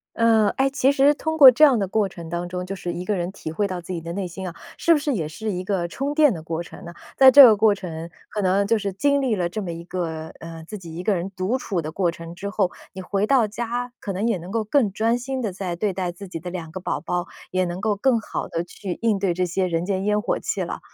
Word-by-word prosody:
呃， 225 -2 +4
诶， 270 +1 +3
其 270 -1 +2
实 280 +1 +4
通 315 +2 -3
过 275 -4 +11
这 300 +6 +6
样 270 -6 +5
的 200 - 0
过 200 +1 +1
程 170 -3 -10
当 175 +1 -3
中， 180 0 -4
就 195 - -4
是 180 -2 -4
一 175 +1 -5
个 210 - 0
人 175 -1 -2
体 175 -5 -7
会 200 +5 0
到 185 -2 -4
自 175 +2 -7
己 170 - -3
的 165 +1 -6
内 190 +1 -3
心 185 +2 -6
啊， 170 - -8 0.2
是 335 - +3
不 320 - +5
是 290 -2 -1
也 160 -8 -2
是 215 +7 -4
一 180 -1 -3
个 185 -2 -1
充 275 +11 -3
电 295 -6 +5
的 160 - -7
过 165 +1 -3
程 - - -12
呢？ 170 - -8 0.2
在 265 -1 +9
这 280 +1 +11
个 225 -4 +7
过 210 0 +4
程， 170 -3 -7 0.2
可 210 - -3
能 195 +2 +2
就 230 - +3
是 200 -2 -2
经 280 +8 +1
历 245 -5 +1
了 175 -2 0
这 210 +5 -4
么 180 - -4
一 170 0 -7
个 165 -3 -4
呃， 165 -1 -9
自 210 +4 -7
己 165 -3 -10
一 175 - -5
个 210 - +2
人 180 +1 -3
独 190 +8 0
处 195 -8 -2
的 155 0 -6
过 180 0 +1
程 170 0 -9
之 200 +3 -5
后， 195 -3 0 0.2
你 190 - -8
回 195 +2 -1
到 260 -5 +4
家， 240 +3 -4
可 200 - -4
能 195 +4 -1
也 225 -5 +1
能 175 +2 -9
够 220 +1 -1
更 220 0 +2
专 225 +4 +1
心 260 +2 -4
地 215 -6 -2
再 180 -2 -4
对 200 +3 0
待 180 -1 -2
自 180 +3 -10
己 170 -3 -7
的 180 +2 -6
两 170 -3 -6
个 185 - -6
宝 - - -2
宝， 175 0 -2 0.3
也 185 0 +2
能 175 +1 -4
够 210 +1 +1
更 235 +3 +2
好 - - -5
地 165 +1 -2
去 180 +1 -6
应 220 -3 +2
对 190 -3 +1
这 180 +1 0
些 185 +1 -1
人 165 0 -1
间 190 -1 -1
烟 210 0 +2
火 220 - -1
气 - - -2
了。 - - -5
195 Hz, 310 characters per minute, -23 LUFS, 175-225 Hz, 0.3 s, 过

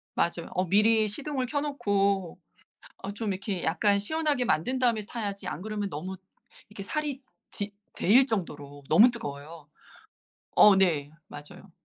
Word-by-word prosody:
맞아요. 170 0 -1
어 185 +1 0
미리 215 +3 +4
시동을 265 +4 -3
켜 285 +3 -1
놓고 200 - 0 0.7
어 195 - -4
좀 210 0 -3
이렇게 190 -1 -4
약간 200 +4 +2
시원하게 295 +2 -1
만든 240 +8 0
다음에 230 -4 +1
타야지 205 -4 -5
안 175 - -5
그러면 210 -1 -3
너무 180 +4 -6 0.5
이렇게 210 -1 -9
살이 285 +4 -3 0.3
디 205 -1 -5 0.2
데일 245 +8 +4
정도로 145 - -5
너무 220 +10 +7
뜨거워요. 150 -6 -8 0.9
어 205 -2 +7
네. 160 -7 +2 0.2
맞아요. 175 +7 -12
200 Hz, 300 characters per minute, -28 LUFS, 175-235 Hz, 0.9 s, 너무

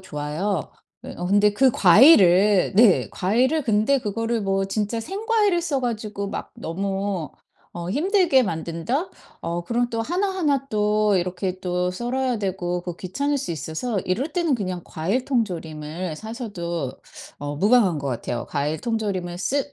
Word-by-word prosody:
좋아요. 160 +2 -3
예 - - -31 0.4
어 175 - -4
근데 205 +2 +4
그 260 +5 +4
과일을 200 - +6
네 215 -3 +5
과일을 250 - +1
근데 225 +4 +2
그거를 230 +1 -2
뭐 195 -1 0
진짜 210 +3 -2
생과일을 405 - 0
써 285 -5 -1
가지고 215 -4 -3
막 - - -6
너무 195 0 -3 0.4
어 175 0 -6
힘들게 320 - +3
만든다? 170 - -2 0.3
어 170 +1 -3
그럼 240 +5 0
또 230 0 -1
하나하나 345 - 0
또 210 -1 +2
이렇게 180 +1 -2
또 180 0 -1
썰어야 245 +3 -1
되고 180 -3 -2
그 175 -1 -6
귀찮을 280 +11 -2
수 270 -10 -3
있어서 175 +7 -3
이럴 245 - -2
때는 330 -6 +1
그냥 185 -4 -3
과일 195 +11 -2
통조림을 165 - -3
사셔도 185 - -5 0.4
어 145 0 -4
무방한 200 -2 +3
것 140 - -3
같아요. 120 -1 -3
과일 150 +2 -2
통조림을 200 -7 -2
쓰 280 +8 -1
205 Hz, 295 characters per minute, -23 LUFS, 175-250 Hz, 0.4 s, 과일을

